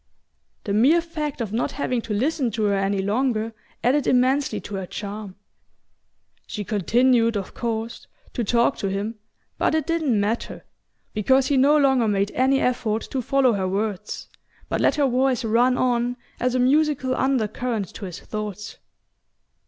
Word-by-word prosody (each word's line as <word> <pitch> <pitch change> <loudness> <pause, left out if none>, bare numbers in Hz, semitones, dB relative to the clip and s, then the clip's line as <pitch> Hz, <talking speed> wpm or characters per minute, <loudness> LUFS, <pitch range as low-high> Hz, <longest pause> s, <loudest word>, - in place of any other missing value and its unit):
The 200 - -2
mere 265 +11 +5
fact 305 -5 -4
of 215 -3 -4
not 235 - -1
having 255 -4 -1
to 225 - -4
listen 265 +3 0
to 220 - -1
her 205 -1 +2
any 195 0 0
longer 225 +1 0 0.3
added 270 +4 +2
immensely 255 -2 +2
to - - -9
her 190 -2 -4
charm. 205 -1 -6 1.1
She 210 - -4
continued, 230 +3 +2
of 195 - -6
course, 230 -1 -4 0.3
to 240 - -1
talk 235 +4 +2
to 195 - -2
him, 205 +3 -3 0.4
but - - +2
it 315 -3 0
didn't 315 -9 +1
matter, 210 +4 -2 0.5
because 260 +5 +3
he 285 - +2
no 285 +3 +5
longer 265 -5 +3
made 200 -1 +1
any 265 +2 +2
effort 225 -3 0
to 265 - -1
follow 260 0 +3
her 190 -2 -1
words, 205 +1 -3 0.4
but - - -1
let - - +3
her 290 -2 +2
voice 255 -1 +1
run 245 +3 +3
on 245 -1 +1 0.2
as 250 +1 0
a - - +2
musical 270 0 +2
undercurrent 240 -4 -1
to 205 - -7
his 180 -1 -7
thoughts. 210 -1 -6
235 Hz, 160 wpm, -23 LUFS, 210-265 Hz, 1.1 s, mere